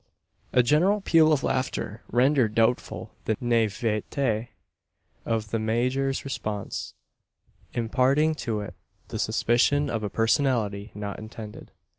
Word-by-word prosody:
A 125 - +4
general 175 - +3
peal 160 -4 +5
of 145 -3 +2
laughter 125 -4 -2
rendered 125 -3 +3
doubtful 115 +2 0
the 110 - 0
naivete 115 +1 0 0.8
of 110 -2 -1
the 115 - 0
major's 125 +5 0
response 105 -7 -4 0.8
imparting 130 +6 +2
to 115 -8 -3
it 105 - -7 0.4
the - - -4
suspicion 140 +4 +2
of 115 - -1
a 105 - -2
personality 115 -4 +1
not 105 -1 -5
intended. 110 -1 -9
120 Hz, 115 wpm, -26 LUFS, 110-135 Hz, 0.8 s, peal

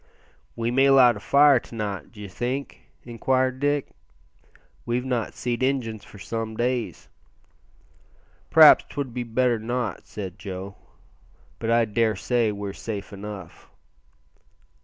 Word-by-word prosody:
"We 115 0 -1
may 135 +2 +4
light 130 -3 +6
a - - -7
fire 140 +3 +5
to 115 - -13
night, 100 -7 -4
d'ye 105 -3 -9
think?" 125 +8 -5
inquired 130 +2 0
Dick; 145 0 0 0.9
"we've 120 +1 -2
not 125 -4 -2
seed 120 -1 -3
Injuns 125 -5 -1
for - - -14
some 110 +2 -5
days." 125 -1 -2 1.4
"P'r'aps - - +8
'twould 140 -4 -5
be 125 - -3
better 120 0 +1
not," 120 +2 -3
said 95 -4 -7
Joe; 95 0 -7 0.9
"but 115 - -3
I 115 0 +4
daresay 115 +1 +1
we're 100 -1 -5
safe 105 -2 -6
enough." 100 -3 -9
115 Hz, 125 wpm, -24 LUFS, 105-125 Hz, 1.4 s, P'r'aps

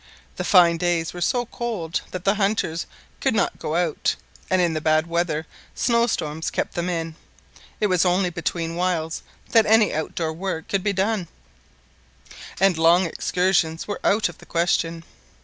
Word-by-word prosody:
The - - -2
fine 175 -3 +5
days 170 -1 0
were 175 - -7
so 245 +8 +1
cold 215 -9 -3
that 185 -1 -6
the 195 - +4
hunters 195 -5 -1 0.3
could - - +1
not - - 0
go 155 - -3
out; 170 -3 0 0.3
and 185 - +2
in 175 -2 +2
the 155 - -2
bad 155 0 +3
weather 170 -2 -1 0.3
snowstorms 225 -10 0
kept - - -3
them 175 +1 -2
in. 165 -2 -3 0.7
It 215 - +2
was 185 -4 +3
only 180 0 +2
between 165 -1 -3
whiles 175 -2 -1 0.3
that 225 -2 +5
any 220 0 +4
outdoor 160 +1 -2
work 170 -1 -4
could 195 -2 -1
be 205 - +1
done; 195 -1 0 1.3
and 190 -3 +3
long 170 +3 +5
excursions 170 -1 0
were 205 - -4
out 210 +2 +3
of 175 - -11
the - - -15
question. 170 -1 0
175 Hz, 165 wpm, -23 LUFS, 165-195 Hz, 1.3 s, fine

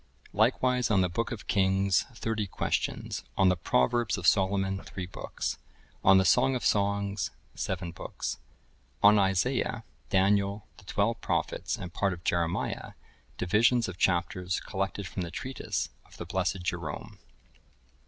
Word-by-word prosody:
Likewise 125 +3 +2
on 100 -4 +4
the 90 - +2
Book 115 +7 -2
of 115 -4 -6
Kings, 95 -1 +2
thirty 110 -2 -2
Questions.(1047) - - -2
On 95 -1 +5
the 90 - +3
Proverbs 95 - +1
of 90 - -5
Solomon, 95 0 +2
three 95 - -6
books. 90 - -4 0.4
On 95 0 +7
the 95 - +4
Song 130 +6 +4
of 125 - -3
Songs, 100 -2 +1 0.2
seven 90 -2 -3
books. 85 - -5 0.6
On 105 +1 +8
Isaiah, 95 -3 +1 0.3
Daniel, 100 +1 +2
the 100 - -16
twelve 105 +5 0
Prophets, - - -1
and 90 -2 -7
Part 100 -2 +1
of 85 -1 -10
Jeremiah, 85 -1 -1 0.4
Divisions 115 +5 +3
of 90 -1 -7
Chapters, 90 0 +1
collected 100 +1 -3
from 95 - -5
the 85 - -3
Treatise 130 +9 -3 0.2
of - - -17
the 85 - -6
blessed 90 0 -1
Jerome. 85 -4 -4
95 Hz, 145 wpm, -29 LUFS, 90-105 Hz, 0.6 s, On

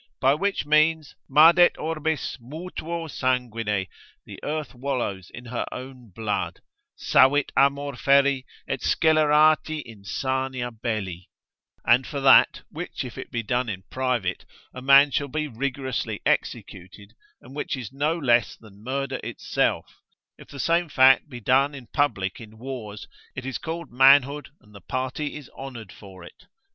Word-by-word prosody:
By 135 +1 +4
which 195 +4 -1
means, 155 +1 +2 0.2
Madet 165 +5 +6
orbis 160 -3 -3
mutuo 165 +4 -6
sanguine, 115 -8 -1 0.4
the - - -10
earth 155 -1 -4
wallows 120 -8 -3
in 120 - -11
her 120 +1 -3
own 130 -2 -9
blood, 105 +3 -3 0.4
Savit 140 +2 +3
amor 140 0 +2
ferri 140 0 +3 0.2
et - - -2
scelerati 155 0 +3
insania 125 +4 -3
belli; 105 -6 -5 0.6
and 125 +2 +4
for 145 - -4
that, 135 -4 +5
which - - -6
if - - -9
it - - -8
be 115 -1 -3
done 125 +2 -1
in 95 -2 -5
private, 125 -8 -1 0.3
a 125 - -8
man 140 +2 +6
shall 145 +2 -1
be 155 +3 -3
rigorously 130 0 -3
executed, 100 +4 -3 0.3
and 130 +3 -14
which 145 - -3
is 125 -1 -8
no 150 +4 0
less 120 - +2
than 105 -2 -18
murder 135 +2 -3
itself; - - -2 0.4
if - - -15
the 140 - -11
same 170 +3 +1
fact 135 +2 +5
be 125 -4 -8
done 135 +5 +2
in 130 -3 -10
public 110 -8 -1
in 110 -1 -13
wars, 110 -4 -7 0.3
it 125 - -6
is 135 -2 -4
called 165 +1 -6
manhood, 135 +3 +4
and 105 - -22
the 100 - -13
party 130 - -4
is 150 -4 -9
honoured 120 -7 -9
for 95 -3 -13
it. 180 - -16
130 Hz, 150 wpm, -24 LUFS, 115-145 Hz, 0.6 s, Madet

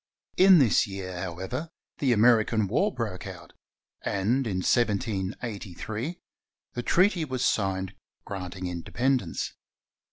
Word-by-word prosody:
In 190 0 +8
this 130 -9 +4
year, 95 -2 -6
however, 95 - -4 0.3
the 135 -3 +2
Ameri 115 -1 +5
can 110 -3 +1
War 160 - +1
broke 110 - -4
out, - - -10 0.5
and 115 +7 0
in 95 -3 -1
1783 110 - -1 0.5
the 120 - -3
treaty 180 - +3
was 130 -4 -2
signed 95 -2 0 0.3
granting 95 -1 -5
independence. 95 +5 -1
110 Hz, 115 wpm, -27 LUFS, 95-130 Hz, 0.5 s, In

